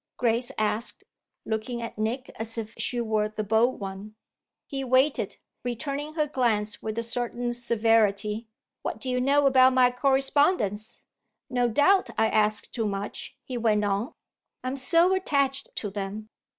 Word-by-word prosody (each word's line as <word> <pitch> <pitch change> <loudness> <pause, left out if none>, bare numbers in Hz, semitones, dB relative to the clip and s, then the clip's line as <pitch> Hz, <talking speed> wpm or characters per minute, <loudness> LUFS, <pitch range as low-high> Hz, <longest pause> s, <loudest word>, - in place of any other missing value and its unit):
Grace 240 +1 +2
asked, 215 +2 0 0.4
looking 220 +2 -3
at 230 -2 -6
Nick 240 +4 -2
as 225 +1 -6
if 220 -1 -5
she 245 - -2
were 215 -2 0
the 215 0 -4
bold 225 +4 +2
one. 200 +2 -7 0.5
He 270 -1 -4
waited, 260 +3 +2 0.3
returning 280 +5 -4
her 305 -2 +2
glance 225 -7 0
with 220 0 -4
a 230 - 0
certain 240 +1 -2
severity. 225 -2 +1 0.3
"What - - -4
do 255 +2 -3
you 250 0 +1
know 280 +2 +3
about 260 -1 +6
my 250 -1 +5
correspondence? 265 - +1 0.5
No 245 -1 +2
doubt 295 - +3
I 220 - +3
ask 215 0 +1
too 225 -3 -1
much," 205 +6 -5
he 250 -2 -5
went 210 -2 +2
on; 205 +8 -1 0.5
"I'm 255 +1 -2
so 335 +7 +3
attached 280 -7 0
to 205 - -3
them. 205 +2 -5
235 Hz, 150 wpm, -27 LUFS, 215-265 Hz, 0.5 s, about